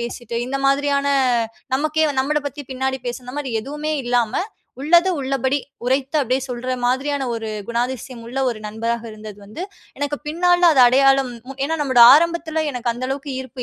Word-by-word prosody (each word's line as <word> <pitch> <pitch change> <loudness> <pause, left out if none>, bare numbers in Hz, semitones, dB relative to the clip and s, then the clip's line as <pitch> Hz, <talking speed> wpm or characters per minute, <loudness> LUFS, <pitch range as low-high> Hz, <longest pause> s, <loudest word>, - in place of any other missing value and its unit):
பேசிட்டு, 235 0 -5
இந்த 270 +2 -2
மாதிரியான 280 0 +1 0.7
நமக்கே, 310 +2 +1 0.2
நம்மள 300 +3 0
பத்தி 285 +1 -9
பின்னாடி 265 +1 -2
பேசி, 245 +1 -4
இந்த 250 - -8
மாரி 270 -4 -4
எதுவுமே 300 +3 -4
இல்லாம, 240 +2 +1 0.4
உள்ளது 340 +6 +4
உள்ளபடி 270 +1 0 0.3
உரைத்து, 265 +4 0
அப்படியே 255 +1 0
சொல்ற 250 +1 -3
மாதிரியான, 275 +3 0
ஒரு 225 -1 -4 0.2
குணாதிசயம் 240 0 -3
உள்ள 255 +3 -5
ஒரு 230 - -6
நண்பராக 230 +2 -3
இருந்தது 215 -1 -10
வந்து, 215 - -7 0.4
எனக்கு 290 0 -1
பின்னாள்ல, 350 +2 +4
அது 265 - +5
அடையாளம் 270 0 +4 0.3
ஏனா, 320 +3 -1
நம்முடைய 260 -4 +6
ஆரம்பத்தில, 325 -1 0
எனக்கு 245 -1 -1
அந்த 250 +2 -4
அளவுக்கு 275 +1 -4
ஈர்ப்பு 260 -1 -8
265 Hz, 160 wpm, -20 LUFS, 245-290 Hz, 0.7 s, நம்முடைய